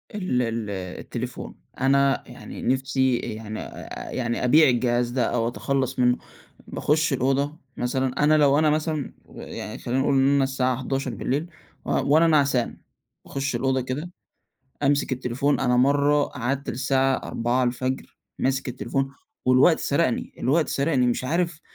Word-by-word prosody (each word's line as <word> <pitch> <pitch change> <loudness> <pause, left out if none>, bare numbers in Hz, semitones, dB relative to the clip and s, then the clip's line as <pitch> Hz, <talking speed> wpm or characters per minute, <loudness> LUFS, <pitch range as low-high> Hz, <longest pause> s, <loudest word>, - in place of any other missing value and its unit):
ال 185 -11 0
ال 115 -3 -2 0.3
التليفون، - - -6 0.3
أنا 140 0 +3
يعني - - -9
نفسي 130 -1 +1
يعني 110 -1 -6
آآ، - - -8
يعني 120 -1 -2
أبيع 150 +3 +6
الجهاز 120 0 +1
ده 125 -1 0
أو 115 -1 0
أتخلص 130 +1 -2
منه. 125 0 +4 0.5
باخُش 155 0 +1
الأوضة 135 +4 0 0.2
مثلًا، 130 +3 -1
أنا 155 +1 +5
لو 145 0 +4
أنا 155 - +4
مثلًا 155 -1 -1
ويعني 105 +3 -8
خلينا 125 +2 -2
نقول 140 +1 +2
إن 135 0 +4
أنا 140 - +3
الساعة 130 -2 0
23:00 135 - -2 0.4
و - - -6
وأنا 160 +4 +4
نعسان 140 -6 +2 0.5
باخُش 135 -2 -3
الأوضة 130 +1 +1
كده 145 +8 -4 0.7
أمسك 140 -1 +2
التليفون، 130 +3 0
أنا 125 -2 +2
مرة 145 +3 +3
قعدت 135 +3 -3
للساعة 135 +1 +1
4:00 125 +2 -1 0.2
ماسك 130 0 0
التليفون، 135 +2 -2 0.3
والوقت 130 +6 +5
سرقني، 140 -3 0
الوقت 150 +6 +1
سرقني، 140 -3 +1
مش 120 +1 0
عارف 170 +2 -1
135 Hz, 140 wpm, -24 LUFS, 125-145 Hz, 0.7 s, أبيع